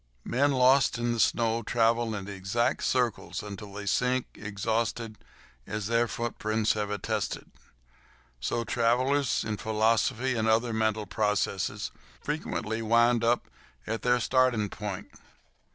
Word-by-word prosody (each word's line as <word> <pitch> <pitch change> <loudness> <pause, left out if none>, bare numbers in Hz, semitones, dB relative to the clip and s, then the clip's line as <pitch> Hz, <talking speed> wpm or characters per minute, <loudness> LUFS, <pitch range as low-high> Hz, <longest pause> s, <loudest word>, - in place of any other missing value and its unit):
Men 140 +4 +2
lost 130 0 +4
in 120 0 0
the 115 - -3
snow 115 0 +2
travel 115 0 +1
in 100 -1 -6
exact 100 +5 -1
circles 125 -6 0
until 100 0 -8
they 105 0 -6
sink, 125 +6 +1
exhausted, 110 +2 -2 0.5
as 105 0 -3
their 115 +2 +2
footprints 110 -2 -1
have 105 -1 -2
attested. 105 -2 -3 0.9
Also, 115 - -1
travellers 125 +5 +1
in 110 -1 -3
philosophy 110 +4 +1
and 110 -2 0
other 115 +1 +2
mental 110 -1 0
processes 105 -2 -1 0.3
frequently 115 -7 -3
wind 115 +1 +3
up 120 +1 +2 0.4
at 110 +1 -3
their 125 0 +3
starting 125 -4 +2
point. 105 -3 -5
115 Hz, 125 wpm, -28 LUFS, 105-120 Hz, 0.9 s, lost